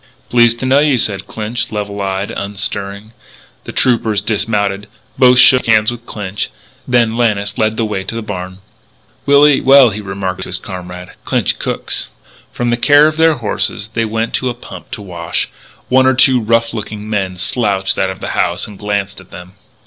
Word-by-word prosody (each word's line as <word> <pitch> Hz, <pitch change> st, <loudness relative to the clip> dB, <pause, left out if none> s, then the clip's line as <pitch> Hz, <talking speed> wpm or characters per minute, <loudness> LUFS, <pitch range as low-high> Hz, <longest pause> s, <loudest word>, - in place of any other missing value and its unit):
"Pleased 120 Hz, -1 st, +4 dB
to -, -, -2 dB
know 135 Hz, +2 st, +4 dB
you," 145 Hz, -3 st, +3 dB
said 100 Hz, -4 st, 0 dB
Clinch, 110 Hz, +1 st, -4 dB
level 105 Hz, -1 st, -4 dB
eyed, 95 Hz, 0 st, -2 dB
unstirring. 100 Hz, +1 st, -4 dB, 0.5 s
The -, -, -6 dB
troopers 115 Hz, -4 st, +1 dB
dismounted. 105 Hz, -2 st, -1 dB, 0.3 s
Both 125 Hz, -1 st, +6 dB
shook 125 Hz, 0 st, +6 dB
hands 110 Hz, 0 st, +4 dB
with 120 Hz, 0 st, -10 dB
Clinch. 100 Hz, -1 st, -4 dB, 0.4 s
Then 120 Hz, -3 st, +2 dB
Lannis 105 Hz, -4 st, 0 dB
led 110 Hz, 0 st, +1 dB
the 115 Hz, -, 0 dB
way 105 Hz, -3 st, -3 dB
to -, -, -4 dB
the 115 Hz, -, -4 dB
barn. 95 Hz, -2 st, -6 dB, 0.7 s
"We'll 140 Hz, +1 st, +6 dB
eat 145 Hz, -2 st, +3 dB
well," 135 Hz, -3 st, +7 dB
he 105 Hz, +1 st, -5 dB
remarked 95 Hz, -2 st, -4 dB
to -, -, -6 dB
his -, -, -2 dB
comrade. 90 Hz, -1 st, -8 dB
"Clinch -, -, 0 dB
cooks." -, -, -3 dB, 0.4 s
From 120 Hz, -1 st, -2 dB
the 120 Hz, -, +1 dB
care 145 Hz, +4 st, +5 dB
of 155 Hz, -, -1 dB
their 160 Hz, -1 st, +4 dB
horses 110 Hz, -2 st, -3 dB
they 115 Hz, +1 st, -1 dB
went 115 Hz, +1 st, -2 dB
to 130 Hz, -, 0 dB
a 120 Hz, -, -4 dB
pump 120 Hz, -, -11 dB
to 105 Hz, -, -7 dB
wash. 85 Hz, -3 st, -3 dB, 0.4 s
One 130 Hz, +1 st, +4 dB
or 130 Hz, -, +3 dB
two 130 Hz, -1 st, +4 dB
rough 115 Hz, +1 st, +1 dB
looking 105 Hz, -1 st, -6 dB
men 95 Hz, -4 st, -2 dB
slouched 95 Hz, 0 st, 0 dB
out 95 Hz, -, +1 dB
of 95 Hz, -, -7 dB
the -, -, -4 dB
house 85 Hz, -, 0 dB
and 105 Hz, -2 st, -12 dB
glanced 100 Hz, -2 st, -3 dB
at 95 Hz, -, -19 dB
them. 90 Hz, +1 st, -11 dB
110 Hz, 190 wpm, -15 LUFS, 100-120 Hz, 0.7 s, well